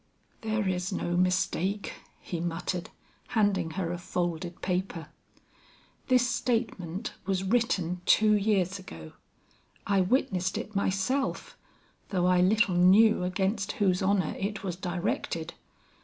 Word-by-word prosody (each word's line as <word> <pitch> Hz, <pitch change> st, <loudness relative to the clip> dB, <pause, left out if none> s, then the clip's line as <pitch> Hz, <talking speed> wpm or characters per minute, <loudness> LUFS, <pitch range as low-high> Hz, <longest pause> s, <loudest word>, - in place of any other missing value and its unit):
"There 220 Hz, -2 st, -1 dB
is 180 Hz, 0 st, -1 dB
no 175 Hz, -2 st, -2 dB
mistake," 185 Hz, +2 st, 0 dB, 0.3 s
he 170 Hz, -, -5 dB
muttered, 175 Hz, +1 st, -3 dB, 0.5 s
handing 195 Hz, -6 st, +2 dB
her 175 Hz, -3 st, -1 dB
a 175 Hz, -, -4 dB
folded 175 Hz, 0 st, -3 dB
paper. 180 Hz, -3 st, -2 dB, 1.0 s
"This 250 Hz, -1 st, +4 dB
statement 220 Hz, -6 st, -2 dB
was 190 Hz, -1 st, 0 dB
written 190 Hz, -5 st, 0 dB
two 215 Hz, 0 st, +5 dB
years 200 Hz, -2 st, +1 dB
ago; 80 Hz, -, -10 dB, 0.7 s
I 195 Hz, -1 st, +3 dB
witnessed 190 Hz, -3 st, +1 dB
it 215 Hz, -, -6 dB
myself, 200 Hz, +8 st, -1 dB, 0.5 s
though 180 Hz, -3 st, +1 dB
I 180 Hz, 0 st, +4 dB
little 205 Hz, +2 st, +3 dB
knew 190 Hz, +5 st, +5 dB
against 190 Hz, +2 st, -1 dB
whose 185 Hz, -3 st, +1 dB
honor 190 Hz, -4 st, +1 dB
it 200 Hz, +1 st, -3 dB
was 180 Hz, -3 st, -3 dB
directed. 175 Hz, -2 st, -3 dB
190 Hz, 120 wpm, -28 LUFS, 180-205 Hz, 1.0 s, two